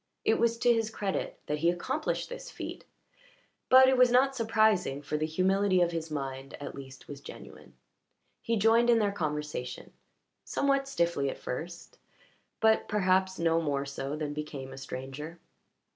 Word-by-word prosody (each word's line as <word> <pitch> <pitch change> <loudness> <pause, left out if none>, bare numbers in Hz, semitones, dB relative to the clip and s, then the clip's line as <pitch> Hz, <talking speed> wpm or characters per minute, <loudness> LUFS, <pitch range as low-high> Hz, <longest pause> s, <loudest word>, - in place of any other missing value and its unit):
It 220 - +3
was 230 0 +2
to 240 0 +4
his 225 -1 0
credit 200 -3 -3
that 150 0 -2
he 170 +2 +3
accomplished 175 0 -2
this - - -8
feat, - - -7 0.8
but 260 0 +8
it 260 0 +4
was 250 0 +6
not 265 +2 +3
surprising 215 - +2
for 150 - -3
the 155 +1 0
humility 185 +3 +2
of 175 -1 +3
his 165 -1 -4
mind 135 -2 -5
at 145 - -6
least 135 -1 -11
was 140 -1 -9
genuine. - - -12 0.7
He 230 -1 0
joined 225 +3 +4
in 235 - +6
their 210 -2 +2
conversation, 150 -7 -4 0.5
somewhat 275 -1 0
stiffly 170 - 0
at - - -5
first, 170 +7 -7 0.6
but 220 0 +3
perhaps 190 -2 +2
no 165 0 +2
more 140 -3 -1
so 140 +1 -4
than 150 -1 -3
became 145 -3 -6
a - - -10
stranger. 135 +5 -7
175 Hz, 160 wpm, -29 LUFS, 145-225 Hz, 0.8 s, but